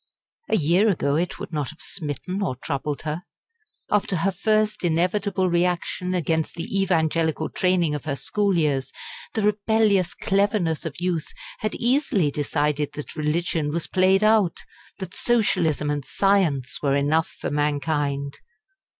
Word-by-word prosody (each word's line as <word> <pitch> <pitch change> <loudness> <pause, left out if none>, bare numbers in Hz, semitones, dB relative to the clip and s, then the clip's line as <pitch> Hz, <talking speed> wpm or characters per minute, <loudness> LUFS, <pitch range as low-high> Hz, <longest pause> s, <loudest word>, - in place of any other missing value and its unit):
A - - +3
year 175 +6 +3
ago 145 -7 +1
it 175 +3 -1
would - - -8
not 150 -3 -1
have 155 - -12
smitten 180 +3 -4
or 180 -10 -1
troubled 140 +2 -4
her. 155 +2 -3 0.7
After 205 -2 +1
her 195 +3 +1
first 215 +3 +1
inevitable 185 +3 +1
reaction 180 +1 0
against 160 -2 0
the 195 +4 -1
evangelical 160 -4 +1
training 180 -4 +1
of 150 - -4
her 145 -3 -1
school 200 +5 0
years, 145 -5 0 0.4
the 220 - 0
rebellious 210 -3 +2
cleverness 195 -6 0
of 140 -1 -7
youth 175 -3 -2 0.3
had - - -2
easily 240 - +2
decided 150 0 -1
that 150 - -7
religion 155 0 0
was 165 +2 -1
played 190 +2 +3
out, 215 -5 +3 0.4
that 190 -2 -7
Socialism 180 - +1
and 145 -1 -2
Science 170 -9 +1
were 140 -2 +2
enough 150 +3 +2
for - - -3
mankind. 145 -1 -1
170 Hz, 140 wpm, -24 LUFS, 150-195 Hz, 0.7 s, A